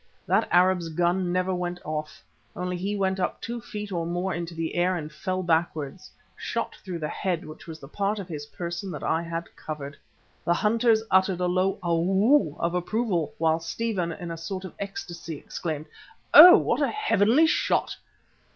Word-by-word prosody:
That -, -, +2 dB
Arab's 180 Hz, -1 st, +3 dB
gun 175 Hz, +2 st, 0 dB
never 185 Hz, +1 st, 0 dB
went 180 Hz, 0 st, -3 dB
off. 155 Hz, -, -5 dB, 0.3 s
Only 180 Hz, 0 st, -3 dB
he 195 Hz, +4 st, -2 dB
went 190 Hz, -1 st, 0 dB
up 180 Hz, -, -1 dB
two 235 Hz, 0 st, -5 dB
feet 210 Hz, -1 st, -7 dB
or 170 Hz, -2 st, -1 dB
more 175 Hz, +2 st, -2 dB
into 170 Hz, 0 st, -5 dB
the 165 Hz, 0 st, -3 dB
air 180 Hz, +1 st, +2 dB
and 155 Hz, -3 st, -5 dB
fell 185 Hz, +4 st, -3 dB
backwards, 165 Hz, 0 st, -1 dB, 0.3 s
shot -, -, -3 dB
through 180 Hz, -3 st, -5 dB
the 155 Hz, -2 st, -3 dB
head 175 Hz, -1 st, -2 dB
which 155 Hz, -, -11 dB
was 160 Hz, -1 st, -8 dB
the 135 Hz, -, -11 dB
part 200 Hz, +7 st, -1 dB
of 195 Hz, -3 st, -6 dB
his 150 Hz, -4 st, -6 dB
person 175 Hz, +4 st, -5 dB
that 150 Hz, -, -7 dB
I 160 Hz, -, +1 dB
had 170 Hz, 0 st, -6 dB
covered. 150 Hz, -2 st, -7 dB, 0.5 s
The 170 Hz, -, +2 dB
hunters 220 Hz, +2 st, +3 dB
uttered 190 Hz, -1 st, +3 dB
a 180 Hz, -, +1 dB
low 185 Hz, +2 st, +1 dB
"Ow!" 190 Hz, -, +2 dB
of 170 Hz, +1 st, 0 dB
approval, 180 Hz, -2 st, -1 dB
while 160 Hz, 0 st, +2 dB
Stephen, 180 Hz, 0 st, -2 dB
in 170 Hz, +1 st, -6 dB
a 165 Hz, -, -5 dB
sort 185 Hz, +3 st, -5 dB
of 185 Hz, -, -8 dB
ecstasy, 170 Hz, -5 st, -6 dB
exclaimed: 155 Hz, 0 st, -5 dB, 0.5 s
"Oh! 350 Hz, +4 st, +12 dB
what -, -, 0 dB
a -, -, +3 dB
heavenly 300 Hz, -, +3 dB
shot!" -, -, +1 dB
180 Hz, 180 wpm, -26 LUFS, 165-195 Hz, 0.5 s, Oh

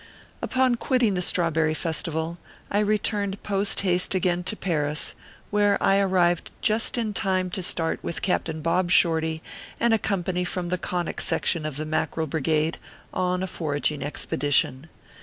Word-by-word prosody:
Upon 255 Hz, -2 st, +2 dB
quitting 245 Hz, -4 st, +2 dB
the 180 Hz, -, -1 dB
Strawberry 160 Hz, -3 st, +2 dB
Festival 160 Hz, +1 st, -2 dB, 0.3 s
I 205 Hz, -, +2 dB
returned 205 Hz, -1 st, 0 dB
post 200 Hz, 0 st, +1 dB
haste 180 Hz, -1 st, +1 dB
again 180 Hz, -1 st, +1 dB
to 215 Hz, -, -2 dB
Paris, 150 Hz, -6 st, 0 dB, 0.4 s
where 205 Hz, -1 st, +3 dB
I 195 Hz, 0 st, +3 dB
arrived 180 Hz, -3 st, +2 dB
just 220 Hz, +3 st, +1 dB
in 220 Hz, -3 st, -1 dB
time 185 Hz, -2 st, 0 dB
to 190 Hz, -, -3 dB
start 165 Hz, -2 st, 0 dB
with 170 Hz, -, -4 dB
Captain 160 Hz, -4 st, -1 dB
Bob 175 Hz, +2 st, +1 dB
Shorty 160 Hz, -2 st, +3 dB, 0.4 s
and 235 Hz, -1 st, +3 dB
a 225 Hz, -, +3 dB
company 180 Hz, -3 st, -1 dB
from 180 Hz, 0 st, -3 dB
the 180 Hz, 0 st, -1 dB
Conic 175 Hz, -1 st, -3 dB
Section 160 Hz, -3 st, 0 dB
of 145 Hz, -3 st, -6 dB
the 155 Hz, -, -3 dB
Mackerel 160 Hz, +1 st, -1 dB
Brigade 155 Hz, +1 st, 0 dB, 0.3 s
on 180 Hz, 0 st, 0 dB
a -, -, -2 dB
forag 155 Hz, -5 st, 0 dB
ing 145 Hz, -2 st, -6 dB
expedition. 145 Hz, 0 st, 0 dB
175 Hz, 160 wpm, -25 LUFS, 160-195 Hz, 0.4 s, where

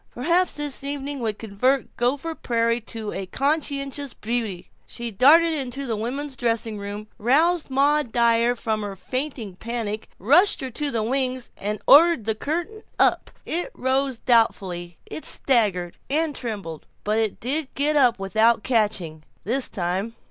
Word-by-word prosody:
Perhaps 340 Hz, +8 st, +1 dB
this 290 Hz, -2 st, -4 dB
evening 280 Hz, 0 st, -3 dB
would 220 Hz, -3 st, -2 dB
convert 240 Hz, +5 st, 0 dB
Gopher 275 Hz, +7 st, -1 dB
Prairie 230 Hz, -4 st, 0 dB
to 210 Hz, -4 st, -5 dB
conscious 280 Hz, -, -2 dB
beauty. 215 Hz, -6 st, -4 dB, 0.2 s
She 235 Hz, -1 st, -6 dB
darted 320 Hz, -, +6 dB
into 275 Hz, -2 st, -3 dB
the 230 Hz, -3 st, -2 dB
women's 265 Hz, +6 st, -4 dB
dressing 230 Hz, -3 st, -1 dB
room, 205 Hz, +1 st, -6 dB
roused 310 Hz, +9 st, +2 dB
Maud 280 Hz, -1 st, +2 dB
Dyer 235 Hz, 0 st, +3 dB
from 220 Hz, -2 st, -2 dB
her 205 Hz, -1 st, -5 dB
fainting 255 Hz, -4 st, -4 dB
panic, 225 Hz, -2 st, -4 dB
pushed 340 Hz, -, +4 dB
her 260 Hz, -1 st, -4 dB
to 295 Hz, +4 st, -2 dB
the 230 Hz, -5 st, -1 dB
wings, 255 Hz, +1 st, -2 dB
and 210 Hz, +1 st, -4 dB
ordered 315 Hz, -5 st, +6 dB
the 220 Hz, -, +1 dB
curtain 345 Hz, -, -3 dB, 0.2 s
up. -, -, +3 dB, 0.2 s
It 350 Hz, +8 st, -2 dB
rose 260 Hz, 0 st, 0 dB
doubtfully, 185 Hz, -8 st, +1 dB
it 315 Hz, -, -6 dB
staggered 200 Hz, -9 st, +2 dB
and 305 Hz, +1 st, +1 dB
trembled, 200 Hz, -, -6 dB, 0.2 s
but 215 Hz, +2 st, +1 dB
it 220 Hz, -3 st, -1 dB
did 275 Hz, +4 st, -1 dB
get 295 Hz, +2 st, +1 dB
up 250 Hz, -5 st, +4 dB
without 220 Hz, +3 st, +2 dB
catching 205 Hz, -10 st, 0 dB, 0.2 s
this 250 Hz, +5 st, -1 dB
time. 190 Hz, +4 st, -2 dB
240 Hz, 150 wpm, -23 LUFS, 215-280 Hz, 0.2 s, darted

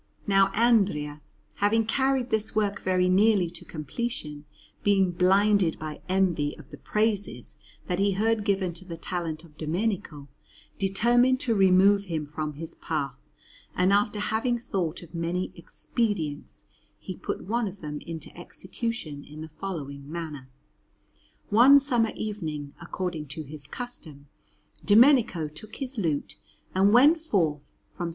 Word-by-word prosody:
Now 195 Hz, -1 st, +4 dB
Andrea, 195 Hz, -11 st, +2 dB, 0.4 s
having 220 Hz, +2 st, +2 dB
carried 265 Hz, +1 st, +1 dB
this 220 Hz, 0 st, -1 dB
work 205 Hz, -1 st, 0 dB
very 185 Hz, -1 st, +2 dB
nearly 190 Hz, -2 st, +3 dB
to 175 Hz, -, -9 dB
completion, 150 Hz, -, -5 dB, 0.4 s
being 195 Hz, -3 st, +3 dB
blinded 190 Hz, 0 st, +3 dB
by 155 Hz, -1 st, -7 dB
envy 175 Hz, -6 st, +1 dB
of -, -, -15 dB
the -, -, -9 dB
praises 210 Hz, -1 st, -1 dB, 0.3 s
that 180 Hz, -1 st, -2 dB
he 200 Hz, 0 st, +2 dB
heard 220 Hz, +2 st, +1 dB
given 195 Hz, -4 st, 0 dB
to 170 Hz, -, -5 dB
the 170 Hz, -3 st, -8 dB
talent 165 Hz, -2 st, -4 dB
of 155 Hz, -3 st, -19 dB
Domenico, 165 Hz, -3 st, -2 dB, 0.5 s
determined 240 Hz, +6 st, +3 dB
to 235 Hz, -, +1 dB
remove 195 Hz, 0 st, +5 dB
him 160 Hz, -5 st, -3 dB
from 150 Hz, +1 st, -4 dB
his 160 Hz, +3 st, -7 dB
path; 145 Hz, -5 st, -3 dB, 0.6 s
and 185 Hz, +2 st, +3 dB
after 205 Hz, +1 st, +2 dB
having 220 Hz, +4 st, 0 dB
thought 180 Hz, -8 st, -3 dB
of 170 Hz, -, -15 dB
many 170 Hz, +2 st, -2 dB
expedients, 170 Hz, -, -3 dB, 0.3 s
he -, -, -7 dB
put -, -, -5 dB
one 230 Hz, +3 st, 0 dB
of 195 Hz, +1 st, -9 dB
them 150 Hz, -2 st, -5 dB
into 160 Hz, -2 st, -8 dB
execution 175 Hz, -4 st, -6 dB
in 150 Hz, +1 st, -11 dB
the 160 Hz, -, -6 dB
following 150 Hz, -5 st, -7 dB
manner. 155 Hz, -6 st, -6 dB, 1.0 s
One 255 Hz, +7 st, +8 dB
summer 245 Hz, -5 st, +1 dB
evening, 155 Hz, -10 st, -5 dB
according 170 Hz, -3 st, -4 dB
to 155 Hz, +3 st, -6 dB
his 145 Hz, -1 st, -7 dB
custom, 155 Hz, -, -7 dB, 0.5 s
Domenico 220 Hz, -, +5 dB
took 155 Hz, +9 st, -11 dB
his 265 Hz, -3 st, -4 dB
lute 155 Hz, -7 st, -2 dB, 0.4 s
and 195 Hz, +2 st, +4 dB
went 285 Hz, +8 st, +6 dB
forth 170 Hz, -, -1 dB, 0.2 s
from 175 Hz, -2 st, -5 dB
S. -, -, -3 dB
185 Hz, 145 wpm, -27 LUFS, 155-215 Hz, 1.0 s, One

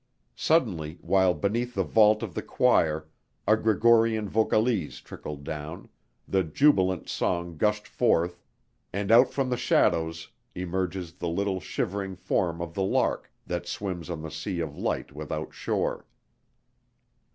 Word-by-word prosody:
Suddenly, 90 Hz, -, +1 dB
while 95 Hz, -2 st, +3 dB
beneath 120 Hz, +5 st, -1 dB
the -, -, +2 dB
vault 110 Hz, 0 st, +4 dB
of 100 Hz, -6 st, -5 dB
the -, -, -3 dB
choir 80 Hz, -1 st, +2 dB, 0.4 s
a 110 Hz, -, +6 dB
Gregorian 110 Hz, 0 st, +3 dB
vocalise 110 Hz, -3 st, +1 dB
trickled 75 Hz, -1 st, -8 dB
down, 80 Hz, +2 st, -6 dB, 0.4 s
the 95 Hz, -1 st, +2 dB
jubilant 95 Hz, -, +2 dB
song 85 Hz, -1 st, -1 dB
gushed 105 Hz, +5 st, 0 dB
forth, 85 Hz, +1 st, +1 dB, 0.5 s
and 100 Hz, +2 st, -2 dB
out 120 Hz, +3 st, +7 dB
from 135 Hz, -2 st, -1 dB
the 125 Hz, -, +1 dB
shadows 80 Hz, -8 st, +1 dB, 0.3 s
emerges 90 Hz, -1 st, -3 dB
the 90 Hz, -1 st, -4 dB
little 95 Hz, +2 st, -1 dB
shivering 95 Hz, +1 st, -3 dB
form 85 Hz, -2 st, -1 dB
of 85 Hz, -1 st, -7 dB
the 95 Hz, -, -2 dB
lark 95 Hz, -, 0 dB
that 85 Hz, 0 st, -4 dB
swims 90 Hz, -1 st, -4 dB
on 80 Hz, -3 st, -5 dB
the 80 Hz, -, -6 dB
sea 80 Hz, +3 st, -4 dB
of 80 Hz, -3 st, -3 dB
light -, -, -2 dB
without 75 Hz, 0 st, -5 dB
shore.... -, -, -2 dB
95 Hz, 140 wpm, -27 LUFS, 85-105 Hz, 0.5 s, out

